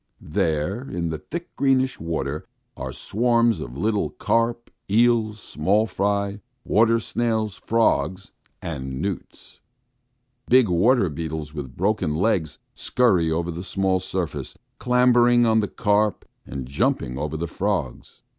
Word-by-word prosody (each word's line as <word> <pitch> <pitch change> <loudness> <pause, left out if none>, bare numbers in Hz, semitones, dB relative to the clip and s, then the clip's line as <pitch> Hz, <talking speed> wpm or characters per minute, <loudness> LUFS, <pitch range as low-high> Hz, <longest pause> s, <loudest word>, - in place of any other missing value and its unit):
There, 85 - 0
in 85 -2 -2
the 80 -1 -4
thick, 170 - -7
greenish 130 -1 +2
water 75 -3 -3 0.3
are - - -5
swarms 115 0 +1
of - - -7
little 105 +4 0
carp, 115 +1 -1 0.2
eels, 110 0 +3
small 100 +6 +1
fry, 100 -1 -1 0.2
water 115 +2 +3
snails, 110 -2 -1
frogs, 100 -3 0 0.3
and 65 -5 -5
newts. 100 +1 -6 0.9
Big 125 -4 +5
water 100 +5 +3
beetles 80 -1 -5
with 65 -5 -7
broken 95 -5 0
legs 85 -5 0 0.2
scurry 95 -10 +2
over 85 +2 -1
the 85 +2 -6
small 95 0 0
surface, 90 -7 -4 0.2
clambering 120 -1 +4
on 110 -1 +4
the 105 - 0
carp, 105 +1 +1 0.2
and 65 -2 -5
jumping 70 - -1
over 75 +1 -3
the 85 - -2
frogs. 90 -8 -3
100 Hz, 125 wpm, -23 LUFS, 80-115 Hz, 0.9 s, Big